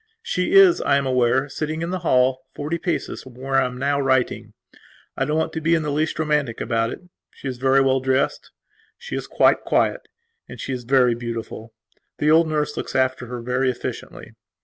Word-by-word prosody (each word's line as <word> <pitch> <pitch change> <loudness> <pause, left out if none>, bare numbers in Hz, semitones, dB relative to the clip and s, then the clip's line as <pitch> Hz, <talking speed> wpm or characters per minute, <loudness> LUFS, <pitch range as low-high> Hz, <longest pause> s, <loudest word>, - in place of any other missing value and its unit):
She 475 -3 -1
is, 390 -3 +7
I 140 - +3
am 140 - -1
aware, 130 +1 +2
sitting 155 +2 -4
in 170 - -3
the 185 - -2
hall, 130 -5 +2
forty 155 +4 -3
paces 175 -1 -3
from 130 -2 -14
where 135 +1 0
I 130 - +1
am 125 0 -8
now 140 +2 0
writing. 130 -2 0 0.6
I 135 - 0
don't 150 +2 -1
want 160 0 -1
to 160 - -3
be 165 +2 +3
in 165 - 0
the 150 - -2
least 155 +2 -1
romantic 150 -6 0
about 115 -1 0
it. - - -8 0.3
She - - -10
is 125 -2 -5
very 135 +1 +4
well 135 0 +2
dressed; 130 +1 -1 0.5
she 485 +1 -7
is - - -4
quite - - +3
quiet; - - 0 0.5
she 135 - -4
is 125 -2 -6
very 125 -1 +4
beautiful. 115 -1 -6 0.5
The 150 +1 +2
old 165 +1 +5
nurse 150 -1 -1
looks - - -5
after 130 -1 0
her 125 0 -6
very 125 +2 0
efficiently. 125 - -6
135 Hz, 200 wpm, -22 LUFS, 125-155 Hz, 0.6 s, is